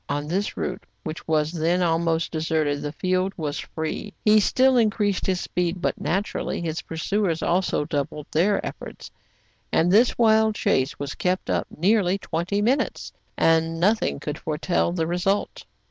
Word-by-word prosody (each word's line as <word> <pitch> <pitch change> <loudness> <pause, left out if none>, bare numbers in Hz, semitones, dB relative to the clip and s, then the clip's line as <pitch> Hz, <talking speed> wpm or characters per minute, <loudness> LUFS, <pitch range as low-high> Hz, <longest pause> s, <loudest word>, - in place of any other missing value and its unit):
On 145 +1 -2
this 195 +6 -2
route, 185 - -3 0.2
which 155 +1 -6
was 155 -1 +1
then 170 +2 +1
almost 165 -1 +1
deserted, 155 -2 0
the 145 - -3
field 185 +4 0
was 150 -3 -3
free. 160 +6 -5
He 215 0 +6
still 260 +5 +3
increased 210 -4 +1
his 185 -2 +1
speed; 180 +1 -2
but, - - -2
naturally, 195 +5 -2
his 165 -2 -3
pursuers 165 +1 -1
also 175 -4 +1
doubled 145 -1 -3
their 195 +6 +2
efforts, - - -8 0.6
and 170 +2 +3
this 230 +5 +4
wild 220 -2 +4
chase 130 -6 +1
was 140 -1 -4
kept 185 +1 -1
up - - 0
nearly 195 +2 +2
twenty 190 +3 -2
minutes, 255 +6 0 0.2
and 165 0 +2
nothing 205 -2 +1
could 150 +1 -5
foretell 165 +3 0
the 170 -2 -1
result. 180 +4 -1
175 Hz, 155 wpm, -24 LUFS, 160-200 Hz, 0.6 s, He